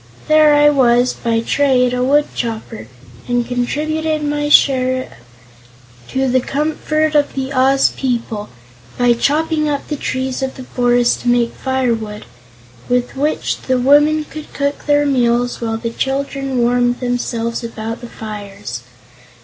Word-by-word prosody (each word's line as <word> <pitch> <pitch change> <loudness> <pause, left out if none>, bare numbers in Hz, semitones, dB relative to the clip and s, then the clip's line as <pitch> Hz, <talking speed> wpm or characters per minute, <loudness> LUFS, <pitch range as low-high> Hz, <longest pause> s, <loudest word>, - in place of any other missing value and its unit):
There 310 -1 +5
I 295 0 +5
was, 250 -3 +3
by 230 -1 -1
trade, 250 -1 +2
a 250 0 0
woodchopper, 235 - -1 0.4
and 245 -1 0
contributed 305 +5 -1
my 295 0 -1
share 255 -2 +3 0.9
to 265 0 -1
the 255 0 +3
comfort 310 +2 -1
of 290 -1 +1
the 270 +1 -3
Oz 270 +1 +3
people 230 -5 -3 0.5
by 245 -1 +4
chopping 305 +5 0
up 285 -1 -3
the 300 - -2
trees 260 -1 -3
of 265 0 -3
the 260 - -8
forest 245 -1 +1
to - - -6
make 240 -1 +2
firewood, 230 -5 -2 0.6
with 245 +1 0
which 295 +3 -1
the 260 -1 0
women 295 +4 +4
would 310 0 -8
cook 285 +1 -2
their 290 0 +3
meals 245 -3 +1
while 225 -1 -2
the 230 0 -4
children 270 +1 -2
warmed 245 0 +2
themselves 240 -2 -2
about 230 0 -5
the 240 - -9
fires. 200 - -7
255 Hz, 140 wpm, -17 LUFS, 240-290 Hz, 0.9 s, There